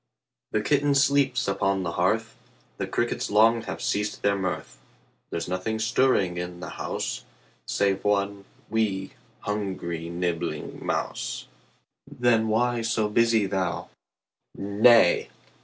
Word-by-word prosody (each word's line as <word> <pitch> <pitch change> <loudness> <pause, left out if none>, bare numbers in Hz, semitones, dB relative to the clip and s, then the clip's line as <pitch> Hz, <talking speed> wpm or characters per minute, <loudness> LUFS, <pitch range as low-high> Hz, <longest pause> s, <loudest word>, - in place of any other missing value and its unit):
The 110 - 0
kitten 145 +1 +2
sleeps 140 -3 +3
upon 95 0 +1
the 85 - -2
hearth, 105 +7 0 0.4
The - - -3
crickets - - -1
long 115 +3 +5
have - - -5
ceased 105 0 -1
their 100 0 +3
mirth; 90 -11 -4 0.5
There's 85 - -3
nothing 95 +5 -2
stirring 110 -5 +2
in 90 0 -5
the 90 - -7
house - - -4 0.4
Save 100 -1 +1
one 100 -1 0 0.2
'wee', 105 -4 -1 0.3
hungry, 95 -5 -3
nibbling 85 -3 -3
mouse, - - -3 0.6
Then 115 -2 +2
why 120 +2 +1
so 115 -2 0
busy 115 -1 +3
thou? 95 -3 -2 0.7
10 100 +1 -5
Nay! 115 -7 +6
100 Hz, 125 wpm, -26 LUFS, 95-115 Hz, 0.7 s, Nay